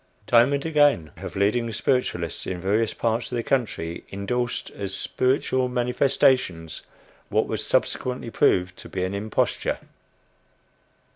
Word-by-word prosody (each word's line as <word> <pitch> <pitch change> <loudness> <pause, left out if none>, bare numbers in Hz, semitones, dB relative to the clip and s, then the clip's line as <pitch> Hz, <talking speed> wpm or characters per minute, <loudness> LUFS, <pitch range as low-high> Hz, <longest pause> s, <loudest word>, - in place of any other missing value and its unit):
Time 120 +3 +5
and 140 +1 -1
again 145 - +3
have - - -7
leading 115 +4 +1
spiritualists, 105 - -1
in 90 -1 -3
various 105 +4 +1
parts 115 +1 -1
of - - -2
the 120 - -1
country, 105 -11 -1
indorsed 120 +5 -2
as 95 -1 -4
"spiritual 130 +2 +1
manifestations," 125 - +1 0.5
what - - +2
was - - -3
subsequently 125 -2 -1
proved 90 -3 +2
to - - -9
be 95 - -2
an 95 +1 -2
imposture. 105 +2 -1
115 Hz, 130 wpm, -24 LUFS, 95-125 Hz, 0.5 s, Time